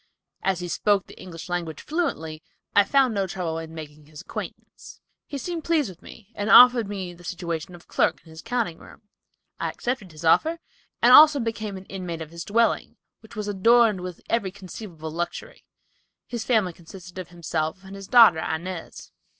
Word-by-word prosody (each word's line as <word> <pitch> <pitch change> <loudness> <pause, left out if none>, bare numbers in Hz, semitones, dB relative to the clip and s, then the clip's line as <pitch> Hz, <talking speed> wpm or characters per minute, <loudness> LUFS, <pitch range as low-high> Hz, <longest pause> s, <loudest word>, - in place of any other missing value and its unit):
As 190 -2 0
he 175 - -4
spoke 200 +2 +1
the - - -14
English 165 -3 -9
language 170 -3 -3
fluently, 160 - -3 0.3
I 205 - +7
found 265 +2 +3
no 195 -2 0
trouble 175 -3 -3
in 160 0 -9
making 150 -1 -10
his 155 +1 -11
acquaintance. - - -9 0.3
"He 285 - -5
seemed 335 +4 -4
pleased 315 -8 +1
with 180 - -13
me 215 0 -14
and 205 0 -3
offered 245 -3 +8
me 190 -3 -5
the 175 0 -16
situation 175 0 -5
of 175 - -17
clerk - - +1
in 160 - -16
his 160 +1 -10
counting 230 -8 -2
room. - - -15 0.6
I - - -1
accepted 240 -7 -4
his 155 +1 -9
offer, 320 - +4 0.5
and 245 +1 +7
also 295 0 +9
became 220 -4 -3
an 190 - -11
inmate 180 -4 -5
of 155 - -13
his 170 0 -7
dwelling, 230 +4 +1 0.2
which 220 +1 -16
was 210 -1 -4
adorned 215 0 +4
with 180 -2 -8
every 230 -4 0
conceivable 185 -4 -9
luxury. 175 - -5 0.6
His 235 -2 -5
family 215 -8 +1
consisted 180 +2 -12
of 185 - -6
himself 170 0 -3
and 195 +1 -10
his 195 -1 -9
daughter, 225 -10 +7
Inez." 170 +2 -5
190 Hz, 185 wpm, -25 LUFS, 170-230 Hz, 0.6 s, also